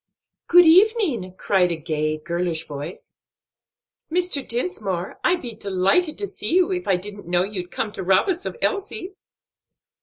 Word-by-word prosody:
"Good 355 0 +7
evening!" 330 - +4
cried 185 -3 +2
a - - 0
gay, 155 -1 -2
girlish 170 0 -3
voice. 145 +4 -8 1.0
"Mr. 355 -4 +2
Dinsmore, 210 - -3
I'd 360 -1 +2
be 240 -2 -6
delighted 200 - +1
to 405 - -3
see 345 - -3
you, 370 +1 +3
if 360 -1 -3
I 190 - +3
didn't 205 +1 -8
know 175 0 +2
you'd 185 -3 -5
come 210 - -3
to 205 - -5
rob 190 - +3
us 370 -1 -1
of - - -6
Elsie." 400 -2 -2
205 Hz, 155 wpm, -22 LUFS, -, 1.0 s, Good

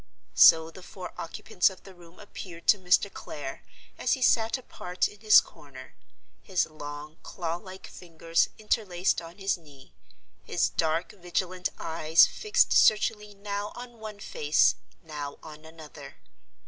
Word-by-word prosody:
So 160 0 +7
the 185 - -13
four 180 0 -9
occupants 180 +2 0
of 190 -2 -14
the 195 - -13
room 175 -1 -18
appeared 180 -4 -10
to 205 - +6
Mr. 185 +2 +2
Clare, 140 -3 -7 0.4
as - - +1
he 265 - -2
sat 225 0 +3
apart 180 -7 -3
in 210 - -15
his 215 0 +7
corner; - - -12 0.5
his 185 -3 0
long 150 0 -9
claw 170 -2 -4
like 190 +1 -11
fingers 165 -1 -1
interlaced 195 -5 0
on 170 +2 -12
his 195 -2 -1
knee; 145 -4 -18 0.5
his - - 0
dark 165 +5 -1
vigilant 180 -1 -3
eyes 160 0 +4
fixed 425 -1 +1
searchingly 210 -1 +3
now 200 +1 -5
on 240 -1 -10
one 215 -2 -8
face, 150 -6 +2 0.3
now 150 -3 -7
on 155 0 -12
another. 155 -3 -12
180 Hz, 145 wpm, -27 LUFS, 160-205 Hz, 0.5 s, So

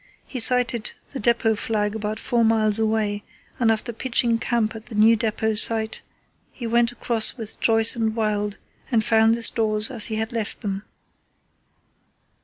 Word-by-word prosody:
He 260 - -7
sighted 240 -1 +3 0.2
the 270 - -5
depot 230 0 +1
flag 210 -1 -2
about 215 0 -5
four 235 -1 -1
miles 220 -1 +2
away, 215 -2 -1 0.4
and 230 -2 +2
after 225 +2 -3
pitching 235 -1 0
camp 230 -2 -2
at 220 +1 -11
the 235 - -8
new 220 +2 +4
depot 220 0 -1
site, 220 0 +2 0.5
he 240 - -9
went 235 +1 +1
across 235 -1 +1
with 220 -3 -9
Joyce 225 -1 +5
and 225 -2 -2
Wild 210 -2 -2 0.3
and 230 -3 +1
found 225 0 +3
the 235 - -7
stores 215 +1 +1
as 235 -5 +5
he 220 - -4
had 220 0 -3
left 225 -3 -5
them. 195 -1 -4
225 Hz, 165 wpm, -22 LUFS, 215-235 Hz, 0.5 s, Joyce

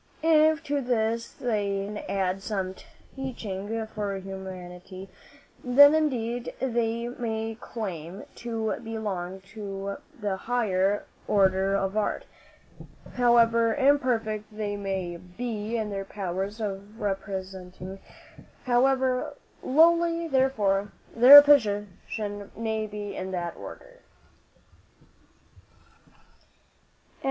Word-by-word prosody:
If 315 0 +4
to 290 -1 -1
this 230 -2 0
they 200 -5 -1
can 210 +1 -5
add 190 -1 -1
some 190 -3 -3 0.4
teaching 225 -5 -4
for 210 -2 -4
humanity, 190 0 -8 0.5
then 285 +4 +8
indeed 245 -6 -1
they 235 -2 -1
may 225 -2 -3
claim 185 -4 -6
to 225 -2 -2
belong 195 -5 -4
to 200 -2 -5 0.2
the 205 -3 -2
higher 205 -4 0 0.2
order 195 -1 +3
of 195 0 -1
art, 215 - -1 0.9
however 230 -2 +4
imperfect 250 -7 +1
they 210 -1 -3
may 190 -3 -3
be 215 +5 -4
in 215 -2 -2
their 195 -1 -4
powers 195 +2 -4
of 205 0 -5
representing 190 -1 -5 0.7
however 255 +1 +2 0.3
lowly, 335 +3 +3
therefore, 210 -8 +1 0.2
their 270 +5 +11
position 205 -5 0
may 220 -1 -2
be 205 -1 -6
in 190 - -4
that 175 -2 -3
order." - - -11
215 Hz, 95 wpm, -27 LUFS, 195-240 Hz, 0.9 s, their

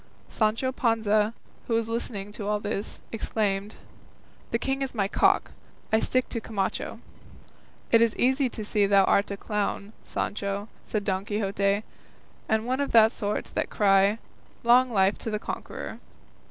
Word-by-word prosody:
Sancho 225 +4 +1
Panza, 220 -4 +2 0.4
who 230 - +1
was 225 -1 +1
listening 215 -3 -3
to 205 -1 -6
all 210 0 +1
this, 205 0 -4
exclaimed, 210 -2 -1 0.7
"The 230 - +1
king 270 +3 -2
is 270 -2 -3
my 200 -3 +1
cock; - - +2 0.4
I 220 - +6
stick 255 +2 +1
to 230 - -3
Camacho." 200 -4 -3 0.9
"It 230 - +6
is 230 -2 +3
easy 265 +1 +2
to 215 -2 -6
see 205 -1 +2
thou 195 -1 +5
art 200 +1 +3
a 200 - -4
clown, 210 0 -2
Sancho," 200 +1 -3 0.2
said 210 -2 -1
Don 190 -1 0
Quixote, 200 0 0 0.7
"and 220 0 +1
one 255 +2 -1
of 280 - -1
that 225 -1 +7
sort 210 -2 -3
that - - -1
cry 200 0 +4 0.5
'Long 250 +2 +5
life 195 -3 +2
to - - -4
the 215 - -1
conqueror. - - -6
215 Hz, 155 wpm, -27 LUFS, 200-230 Hz, 0.9 s, that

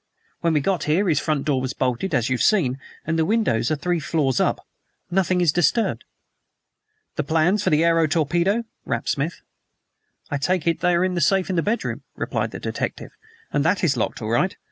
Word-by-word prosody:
When 170 -1 +1
we 150 - +2
got 180 +3 0
here 175 +7 +2
his 155 -4 +3
front 155 -3 -1
door 140 -4 +1
was 130 +1 -3
bolted, 130 +7 -1
as 120 -2 +1
you've 130 -1 -1
seen, 140 -12 +2 0.3
and 165 +1 0
the - - +4
windows 155 - +1
are 155 - +1
three 175 +4 -1
floors 140 -5 0
up. - - 0 0.5
Nothing 185 0 +2
is 170 -4 +4
disturbed." 175 - +1 1.1
"The 150 - +1
plans 170 +7 +1
of - - +3
the 155 +1 +4
aero 165 -1 +3
torpedo?" 175 +8 +1 0.2
rapped - - -3
Smith. - - -2 0.9
"I 145 - 0
take 180 +4 0
it 165 -1 +1
they 180 -1 +2
are 175 +2 +2
in 185 - -1
the 175 - -1
safe 190 +3 +2
in - - -1
his 165 - 0
bedroom," 225 +3 -1
replied - - -2
the - - -8
detective, - - -4 0.4
"and 145 - +2
that 185 +5 +1
is 150 -5 +3
locked 115 -1 -2
all 110 - -3
right. 175 +12 +1
165 Hz, 205 wpm, -23 LUFS, 145-185 Hz, 1.1 s, the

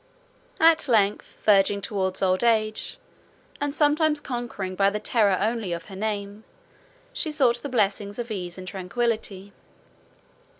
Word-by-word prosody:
At 320 -2 +5
length, 210 -4 +1
verging 200 -1 +4
towards 195 -2 -2
old 185 +3 +2
age, 215 -2 +1 0.6
and 290 0 0
sometimes 300 +1 +2
conquering 240 -8 -5
by 195 +1 +3
the 210 +1 -3
terror 210 -4 +2
only 220 -3 -1
of 170 -1 -6
her 195 - -8
name, 205 0 -4 0.7
she 315 - -1
sought 250 -5 +2
the 285 - -5
blessings 205 -3 0
of 240 -1 -5
ease 180 -4 -5
and 185 0 -9
tranquillity. 200 0 -3
210 Hz, 135 wpm, -25 LUFS, 195-240 Hz, 0.7 s, At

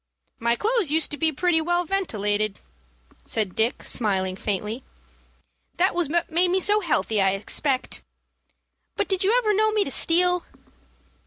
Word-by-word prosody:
"My 235 +1 +1
clothes 440 - 0
used 315 +2 +1
to - - -2
be 315 +2 +2
pretty 325 +2 +1
well 350 +2 0
ventilated," 215 - -1 0.7
said 210 -5 -2
Dick, 225 +3 +1
smiling 190 -5 0
faintly. 210 +5 -3 0.9
"That 370 +2 +2
was 345 -4 0
what 340 +1 -1
made 350 +3 +3
me 370 +2 +2
so 415 +3 +3
healthy, 255 - 0
I 195 0 +3
expect. 255 +7 -1 0.9
But - - -1
did 385 0 -1
you 425 +6 +3
ever 435 -4 +2
know 435 +2 +2
me 425 -1 +2
to 320 - -5
steal?" 360 +3 +3
320 Hz, 155 wpm, -24 LUFS, 220-370 Hz, 0.9 s, made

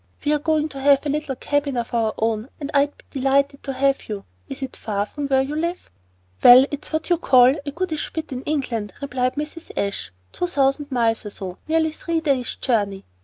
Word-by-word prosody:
We're 300 0 +2
going 310 0 +1
to 275 -2 -8
have 280 +1 +4
a - - 0
little 295 -2 -2
cabin 285 0 -1
of 235 0 -3
our 225 -2 +1
own, 225 +2 -1
and 290 -1 -5
I'd 285 0 +2
be - - -20 0.2
delighted 280 +1 +2
to 270 - -4
have 275 -1 +1
you. 205 -2 -5 0.2
Is - - -6
it 265 - -5
far 205 -2 -2
from 290 +5 -5
where 265 -1 +3
you 285 +3 -4
live?" 340 - -3 0.5
"Well, 250 +2 +10
it's 290 - -6
what 315 +2 -2
you 345 - +5
would - - -23
call 250 -1 +6
'a 285 - -4
goodish 330 -1 -3
bit' 320 -2 -5
in 255 -1 -4
England," 245 -9 -2
replied 255 -2 -1
Mrs. 300 +3 -6
Ashe, 155 - -2 0.2
"two 355 - -2
thousand 285 -2 +1
miles 230 -3 +1
or - - -4
so, 190 -2 -7
nearly 320 0 +2
three 330 +1 -2
days' 275 -6 0
journey. 205 -6 -1
275 Hz, 215 wpm, -22 LUFS, 245-300 Hz, 0.5 s, Well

